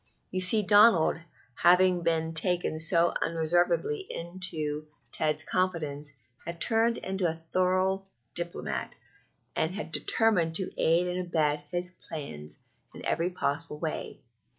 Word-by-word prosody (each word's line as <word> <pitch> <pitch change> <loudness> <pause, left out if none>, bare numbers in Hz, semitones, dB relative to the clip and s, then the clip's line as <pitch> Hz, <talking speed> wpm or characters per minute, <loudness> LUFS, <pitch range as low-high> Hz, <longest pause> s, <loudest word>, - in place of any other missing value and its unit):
You 185 - -2
see, 210 +4 +4
Donald, 205 -5 +5 0.3
having 180 +3 +4
been 165 -1 0
taken 175 -1 0
so 170 +1 +3
unreservedly 175 - 0
into 160 -4 -2 0.2
Ted's 155 -1 -1
confidence, 155 -6 -2 0.3
had 170 0 -7
turned 230 +1 +2
into 190 -1 -2
a 165 0 -5
thorough 185 +1 +1 0.3
diplomat, 120 - -4 0.6
and 160 - 0
had 200 -6 -6
determined 180 -5 +2
to 190 +1 +5
aid 170 +2 +2
and 180 0 -3
abet 150 -3 0
his 180 0 -2
plans 75 - -9 0.4
in - - -9
every 170 +2 0
possible 160 -3 -3
way. 155 0 -5
170 Hz, 125 wpm, -28 LUFS, 160-185 Hz, 0.6 s, Donald